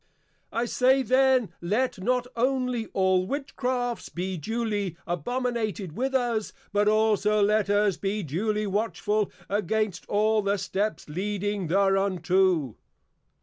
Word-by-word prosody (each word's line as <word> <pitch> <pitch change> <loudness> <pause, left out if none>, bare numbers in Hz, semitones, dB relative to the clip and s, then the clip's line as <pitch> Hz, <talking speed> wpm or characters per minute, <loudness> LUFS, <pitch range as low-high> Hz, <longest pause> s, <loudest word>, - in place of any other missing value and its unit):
I 235 +2 0
say 260 +2 +3
then, 260 -1 +3
let 210 +6 0
not 250 +4 +1
only 250 -1 0
all 190 -1 +1
Witchcrafts 255 -3 -2
be 185 +2 -3
duly 205 0 -2
abominated 215 - -2
with 265 +2 -1
us, 235 -4 0 0.2
but 205 0 +2
also 215 -1 +3
let 210 0 +2
us 205 -2 +2
be 200 +1 -2
duly 210 +8 -1
watchful 210 0 -1 0.2
against 210 -1 -1
all 215 +1 +2
the 200 0 0
Steps 195 0 -2
leading 200 +3 -2
thereunto. 185 - +2
210 Hz, 115 wpm, -26 LUFS, 190-235 Hz, 0.2 s, say